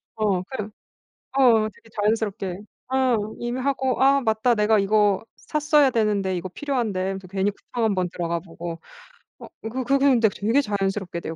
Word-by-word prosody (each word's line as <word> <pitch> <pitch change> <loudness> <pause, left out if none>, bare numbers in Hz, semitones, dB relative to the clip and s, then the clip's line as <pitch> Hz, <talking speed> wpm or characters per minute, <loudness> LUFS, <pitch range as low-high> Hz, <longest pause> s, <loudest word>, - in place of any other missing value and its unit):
어 205 -4 +1
그냥 215 -5 -5 0.7
어 230 -5 +5
되게 225 - -21
자연스럽게. 205 -3 -1 0.3
어 260 -2 +3 0.2
이미 240 +1 -3
하고 265 -1 0
'아 275 +1 +5
맞다. 225 0 +2
내가 215 0 +3
이거 205 0 +2
샀어야 300 -2 +2
되는데. 205 -5 0
이거 180 +1 -4
필요한데.' 240 -6 -2
하면서 190 0 -3
괜히 195 +2 0
쿠팡 230 +3 -5
1 210 - +1
번 185 -1 0
들어가 170 -1 -2
보고. 170 -1 -7 0.6
어 - - -10 0.2
그 255 +3 -3
그 275 +3 +3
근데 260 -5 +4
되게 220 +7 +1
자연스럽게 195 -5 -2
돼요 165 - -5
215 Hz, 330 characters per minute, -24 LUFS, 195-250 Hz, 0.7 s, 어